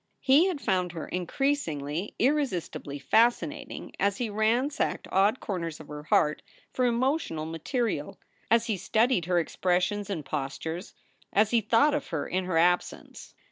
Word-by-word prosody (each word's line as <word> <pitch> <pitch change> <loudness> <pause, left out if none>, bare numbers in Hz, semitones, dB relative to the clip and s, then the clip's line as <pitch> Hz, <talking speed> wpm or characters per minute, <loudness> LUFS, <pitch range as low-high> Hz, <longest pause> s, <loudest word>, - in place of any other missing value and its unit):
He 280 +7 +5
had 360 -6 -2
found 180 -7 0
her 165 - -6
increasingly, 180 - -2
irresistibly 245 - -1
fascinating 225 - 0
as 200 0 +1
he 235 -4 -2
ransacked 230 +7 0
odd 200 +6 +3
corners 170 -6 -4
of - - -12
her 150 0 -6
heart 150 0 +2 0.3
for 255 - +1
emotional 240 - 0
material; 190 - -3 0.3
as 230 0 +4
he 220 -5 -1
studied 220 0 +2
her 180 0 +1
expressions 180 +4 0
and 165 -8 -4
postures; 160 +5 -4 0.4
as 210 +1 +3
he 235 -1 +3
thought 235 +8 +3
of 295 -2 -2
her 160 -3 -3
in 185 0 -1
her 180 -3 0
absence. 175 +2 0
200 Hz, 145 wpm, -28 LUFS, 165-240 Hz, 0.4 s, He